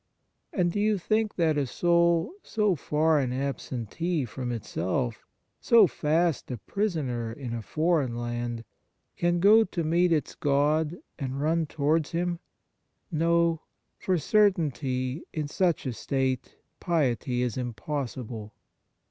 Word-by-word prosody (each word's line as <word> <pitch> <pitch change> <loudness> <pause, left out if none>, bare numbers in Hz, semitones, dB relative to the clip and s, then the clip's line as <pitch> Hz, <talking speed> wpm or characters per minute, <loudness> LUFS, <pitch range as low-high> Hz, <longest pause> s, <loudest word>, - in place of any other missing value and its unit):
And 175 -3 +1
do 205 - -2
you 210 0 +2
think 215 +3 0
that 160 -4 +2
a 140 - 0
soul, 170 - +2
so 210 -4 +1
far 155 +1 +2
an 130 -3 -1
absentee 140 - -2
from 120 +2 -5
itself, 115 +1 -3 0.3
so 230 -3 +6
fast 165 -1 0
a 125 - -3
prisoner 135 - -2
in 120 0 -6
a 115 - -3
foreign 155 - 0
land, 120 -1 -3 0.5
can 175 0 +1
go 210 +5 +7
to 180 -4 -3
meet 170 +3 +2
its 155 -5 0
God 150 +3 +1 0.2
and 135 -1 -3
run 160 +2 +1
towards 155 +2 0
Him? 175 0 -1 0.7
No; 165 0 +2 0.4
for 185 -1 +1
certainly, 150 - +1
in 155 -2 -2
such 175 +1 0
a 130 - -2
state 130 +1 -2 0.2
piety 130 -7 0
is 120 -4 -2
impossible. 120 -3 -5
150 Hz, 130 wpm, -27 LUFS, 125-170 Hz, 0.7 s, go